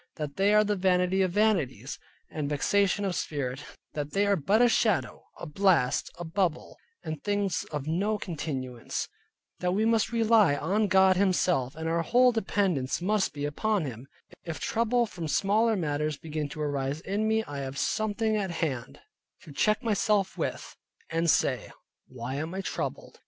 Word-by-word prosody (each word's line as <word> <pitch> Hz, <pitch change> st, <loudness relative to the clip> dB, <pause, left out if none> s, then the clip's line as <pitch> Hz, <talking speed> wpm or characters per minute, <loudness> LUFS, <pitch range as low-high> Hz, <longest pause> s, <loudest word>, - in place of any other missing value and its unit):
That 150 Hz, -2 st, -5 dB
they 195 Hz, +2 st, +3 dB
are 210 Hz, 0 st, +6 dB
the 210 Hz, 0 st, 0 dB
vanity 185 Hz, 0 st, +2 dB
of 185 Hz, -2 st, +1 dB
vanities, 165 Hz, -, 0 dB, 0.3 s
and 150 Hz, -2 st, -3 dB
vexation 200 Hz, +7 st, +1 dB
of 190 Hz, -, -1 dB
spirit, 140 Hz, -3 st, -3 dB, 0.3 s
that 145 Hz, -1 st, -4 dB
they 200 Hz, +1 st, +2 dB
are 200 Hz, 0 st, +3 dB
but 195 Hz, +6 st, +2 dB
a 245 Hz, -, +6 dB
shadow, 220 Hz, -4 st, +1 dB
a -, -, -7 dB
blast, 170 Hz, -5 st, +2 dB
a 175 Hz, -, -5 dB
bubble, 165 Hz, -1 st, -1 dB, 0.3 s
and 155 Hz, -2 st, -5 dB
things 205 Hz, -2 st, -1 dB
of 145 Hz, -3 st, -3 dB
no 195 Hz, +7 st, 0 dB
continuance. 140 Hz, -, -4 dB, 0.5 s
That 180 Hz, 0 st, 0 dB
we 215 Hz, +3 st, +1 dB
must 225 Hz, -1 st, +2 dB
rely 225 Hz, -8 st, +4 dB
on 200 Hz, +9 st, 0 dB
God 190 Hz, -1 st, +5 dB
Himself, 180 Hz, -9 st, +1 dB
and 160 Hz, +1 st, -4 dB
our 165 Hz, +1 st, +1 dB
whole 245 Hz, +7 st, +4 dB
dependance 190 Hz, -, 0 dB
must 200 Hz, +2 st, +1 dB
be 145 Hz, -1 st, -4 dB
upon 195 Hz, +5 st, 0 dB
Him. 125 Hz, 0 st, -7 dB, 0.4 s
If 165 Hz, -2 st, -5 dB
trouble 235 Hz, +1 st, +1 dB
from 175 Hz, -7 st, -6 dB
smaller 210 Hz, +9 st, +2 dB
matters 150 Hz, -4 st, -1 dB
begin 155 Hz, -2 st, -4 dB
to 155 Hz, -, -7 dB
arise 140 Hz, 0 st, -2 dB
in 205 Hz, +4 st, -1 dB
me, 220 Hz, 0 st, +2 dB
I 145 Hz, -8 st, -6 dB
have 135 Hz, 0 st, -5 dB
something 215 Hz, +4 st, 0 dB
at 200 Hz, -3 st, -1 dB
hand 150 Hz, -8 st, -3 dB, 0.4 s
to 155 Hz, -, -12 dB
check 215 Hz, -, +1 dB
myself 210 Hz, -3 st, +1 dB
with, -, -, -4 dB, 0.4 s
and 165 Hz, +1 st, +1 dB
say, -, -, +1 dB, 0.4 s
why 130 Hz, +1 st, -5 dB
am 160 Hz, +5 st, -4 dB
I 195 Hz, -, -2 dB
troubled? -, -, -5 dB
180 Hz, 170 wpm, -28 LUFS, 150-210 Hz, 0.5 s, are